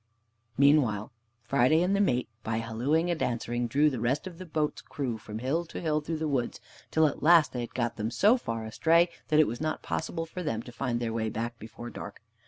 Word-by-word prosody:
Meantime 130 -7 +3 0.3
Friday 140 +6 +3
and 190 +2 +2
the 200 - +2
mate, 125 -10 +1
by 110 +1 -2
hallooing 130 +10 0
and 170 - -2
answering, 120 0 -1
drew 145 +6 +3
the 130 -5 -1
rest 125 - 0
of 180 -2 -8
the 185 - -8
boat's 155 -1 -1
crew 130 -5 -3
from 105 0 -7
hill 135 +9 0
to 165 - -8
hill 155 -2 0
through 160 +2 -3
the 155 0 -2
woods, 130 -5 -1 0.3
till 160 0 +3
at 150 - -1
last 160 -4 +6
they 125 - -3
had 120 - -7
got 120 -2 -1
them 110 0 -1
so 205 - +4
far 115 - -4
astray 165 +10 +3 0.2
that 155 -1 +3
it 155 - +7
was 120 +2 -4
not 155 0 -2
possible 165 0 -3
for 175 +3 -7
them 115 -9 -2
to 120 - -10
find 120 0 -2
their 115 -2 -2
way 110 -1 -1
back 115 +1 -4
before 120 +2 -9
dark. - - -9
135 Hz, 225 wpm, -29 LUFS, 115-160 Hz, 0.3 s, it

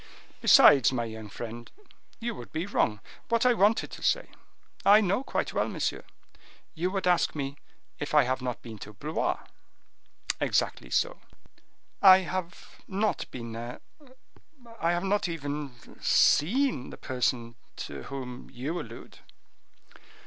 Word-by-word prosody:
"Besides, 135 -4 +7
my 120 -3 -1
young 110 -1 -8
friend, 115 +3 -8 0.5
you 235 0 -3
would - - -10
be 160 +3 -2
wrong; 105 - 0 0.3
what 235 +1 +2
I 250 - +6
wanted 215 0 +2
to - - -9
say—" - - +1 0.5
"I 205 +2 +8
know 200 +4 +1
quite - - -2
well, - - +1
monsieur. - - -2 0.7
You 175 +2 -1
would 195 0 -2
ask 180 -3 +2
me 140 -1 -3 0.4
if 150 +1 -3
I 150 - +7
have 130 +1 -1
not 125 -2 -4
been 110 -3 -9
to 105 - -9
Blois?" 150 +9 -2 1.0
"Exactly - - 0
so." - - 0 0.8
"I 190 -1 +9
have 180 -1 -6
not 205 +3 -1
been 115 -2 -7
there; 120 +2 -6 1.0
I 165 - +1
have 175 +1 -1
not 195 -1 +1
even 145 -4 -4 0.3
seen 230 - +3
the - - -10
person 125 -2 -1 0.2
to - - -7
whom 130 -2 -7
you 140 +7 -4
allude." - - -11
150 Hz, 140 wpm, -28 LUFS, 125-195 Hz, 1.0 s, I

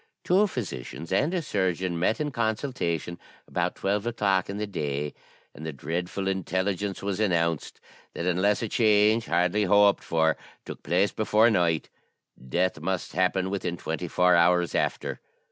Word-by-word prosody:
Two 195 +4 +4
physicians 85 - -6
and 145 - +2
a 180 -3 -1
surgeon 95 - -1
met 100 +6 +1
in 150 -1 -2
consultation 110 - -2 0.3
about - - -1
twelve 100 +3 -1
o'clock 100 -5 +1
in 100 - -4
the 105 - -2
day, 75 -6 -3 0.4
and 80 - -11
the 80 - -3
dreadful 90 +7 -3
intelligence 95 +1 -2
was 100 0 -2
announced, 85 -6 0 0.4
that 85 - -3
unless 95 +5 +2
a - - -1
change, 110 0 +3
hardly 90 +5 +2
hoped 100 +1 +4
for, 80 -1 +1 0.3
took - - -8
place 95 +4 +1
before 110 +1 +3
night, 85 -5 +1 0.6
death 90 +2 0
must 90 +3 -3
happen 95 +1 +1
within 90 -3 -2
twenty - - -4
four 90 0 +3
hours 85 0 +3
after. - - -1
95 Hz, 150 wpm, -26 LUFS, 85-105 Hz, 0.6 s, Two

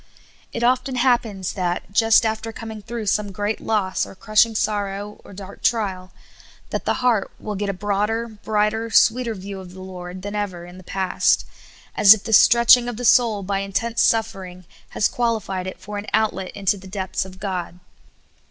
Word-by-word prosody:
It 235 - -4
often 255 +2 +1
happens 235 -7 0
that, 180 0 -3
just 225 +2 +4
after 220 +1 -2
coming 225 -2 -8
through 235 +2 -6
vsome 205 0 0
great 205 +3 -2
loss, 200 -4 0
or - - -8
crushing 215 +3 +2
sorrow, 205 -1 -2
or - - -14
dark 195 0 -10
trial, 190 -5 -1 0.6
that - - -3
the - - +2
heart 225 -5 +2
will 210 - -5
get 205 0 -3
a - - -1
broader, 210 +4 -1
brighter, 215 +1 -1
sweeter 230 +1 +3
view 195 0 -7
of 180 -1 -11
the 190 - -10
Lord 185 0 -8
than 205 0 -5
ever 195 -5 -4
in 175 +1 -12
the - - -13
past, 190 +1 +1 0.5
as 205 +1 +8
if 205 - -11
the 225 - -3
stretching 235 +3 +6
of 240 - -6
the 245 - -4
soul 225 -4 +4
by 195 +1 -1
intense 210 +4 -1
suffering 195 -5 -1 0.2
has - - +1
qualified 220 -6 -2
it 185 - -7
for 205 +2 -6
an 205 - -8
outlet 210 -4 0
into 200 0 0
the 190 0 -12
depths 190 -1 -3
of 185 0 -12
God. 185 -3 -4
205 Hz, 180 wpm, -22 LUFS, 190-225 Hz, 0.6 s, as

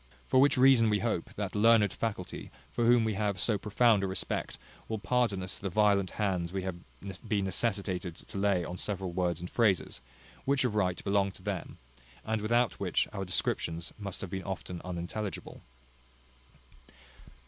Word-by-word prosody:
For 130 - +4
which 140 0 +4
reason, 125 -3 +6
we 105 - +3
hope, 110 -6 -2
that 100 -3 -3
learned 105 0 +5
faculty, 100 -5 -4 0.2
for 115 - +1
whom 120 -1 +6
we 110 -1 0
have 100 -2 -1
so 105 0 +2
profound 105 0 +3
a - - +1
respect, 95 - -3 0.3
will 110 - -2
pardon 115 -3 +1
us 95 +2 -4
the 100 - -3
violent 100 -1 +3
hands 90 -5 0
we 95 0 -3
have 95 -2 -3 0.5
been 100 -2 +1
necessitated 95 -3 -1
to - - -10
lay 95 -4 +2
on 90 +3 -6
several 95 -3 -3
words 90 -1 0
and 90 - -4
phrases, 100 - +1 0.4
which 140 0 +2
of 120 - 0
right 95 -4 0
belong 100 -1 +2
to - - -14
them, - - -4 0.5
and 110 -1 -1
without 120 +2 +1
which - - +1
our 95 -2 -3
descriptions 85 -2 -1
must 100 -3 -5
have 95 - -6
been 95 - -3
often 90 -2 -5
unintelligible. 90 +2 -5
100 Hz, 170 wpm, -30 LUFS, 90-110 Hz, 0.5 s, reason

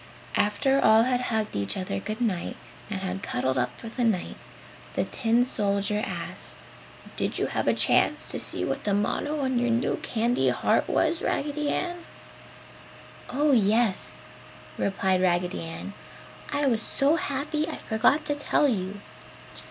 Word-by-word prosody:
After 270 +7 +2
all 220 +1 +7
had 250 0 +1
hugged 220 - -1
each 100 - 0
other 185 0 -2
good 215 +3 -5
night 200 -8 -1 0.3
and 195 -3 -3
had 190 0 -3
cuddled 130 -6 -1
up 125 - -2
for 230 - -8
the 240 +2 -3
night, 215 -6 0 0.6
the - - +2
tin 235 0 +2
soldier 205 -3 0
asked, - - -5 0.6
"Did - - -1
you - - +1
have - - -2
a - - +5
chance - - +3
to - - -3
see - - -2
what - - -3
the 205 -1 +1
motto 290 +8 -1
on 260 -2 +1
your 245 0 +1
new 235 +1 +1
candy 235 +2 +1
heart - - +1
was, 325 +1 +1
Raggedy 295 0 -1
Ann?" 350 +1 -2 1.3
"Oh 290 +3 +2
yes," 220 -3 +1 0.4
replied 190 -1 +1
Raggedy 180 0 +1
Ann, 165 +4 -6 0.6
"I 285 0 +1
was 230 -5 +2
so 285 +8 +2
happy 300 +2 -2
I 325 - -4
forgot 245 +8 +2
to 295 - 0
tell 290 0 +2
you. 200 -4 -2
225 Hz, 155 wpm, -26 LUFS, 195-280 Hz, 1.3 s, all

